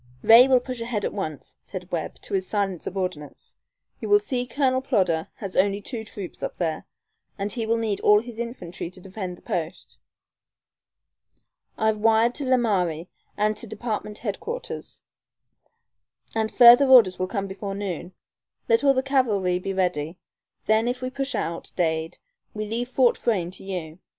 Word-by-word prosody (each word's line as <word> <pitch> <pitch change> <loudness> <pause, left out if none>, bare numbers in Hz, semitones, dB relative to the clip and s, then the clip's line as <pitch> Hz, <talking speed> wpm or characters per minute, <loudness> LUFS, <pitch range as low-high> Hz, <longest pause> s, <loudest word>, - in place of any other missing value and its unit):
"Ray 235 +3 +9
will 260 -1 +5
push 250 -1 -6
ahead 230 -3 -2
at - - -2
once," 155 -8 -6
said 185 -1 -8
Webb, 165 -3 -3
to - - -8
his 190 -1 0
silent 195 -5 -1
subordinates. 180 -6 -5 0.4
"You 415 0 +4
see 255 -11 -3
Colonel 260 -1 +1
Plodder 185 - +1
has 195 -3 -7
only 200 +1 +2
two 220 +2 -6
troops 200 -4 -8
up - - -4
there, 160 -3 -2 0.5
and 200 0 -3
he 230 -3 -3
will 230 +1 +2
need 220 -3 -1
all 210 0 +5
his 230 0 -9
infantry 180 -8 -5
to 185 - -15
defend 185 -1 -6
the - - -22
post. 170 +1 -5 1.8
I've 220 0 +1
wired 225 +2 +4
to 290 - -4
Laramie 190 -10 +1 0.3
and 215 +1 +1
to 235 - -4
Department 215 -1 -4
Headquarters, 420 - -6 1.3
and 220 -1 -1
further 245 +3 +8
orders 230 -9 +7
will 185 - 0
come 200 0 -2
before 195 0 -5
noon. 185 -3 -5 0.5
Let 230 +3 +3
all 275 -1 +5
the 260 - +1
cavalry 210 -10 +1
be 195 +1 -4
ready. 180 -3 -1 0.5
Then 220 +2 +3
if 250 +1 -2
we 255 - -3
push 275 -1 -2
out, 170 -5 -4
Dade, 160 -2 -1 0.4
we 215 0 -3
leave 235 +3 -3
Fort 255 -1 +3
Frayne 185 -7 0
to - - -12
you. 175 -4 -6
210 Hz, 165 wpm, -25 LUFS, 185-240 Hz, 1.8 s, Ray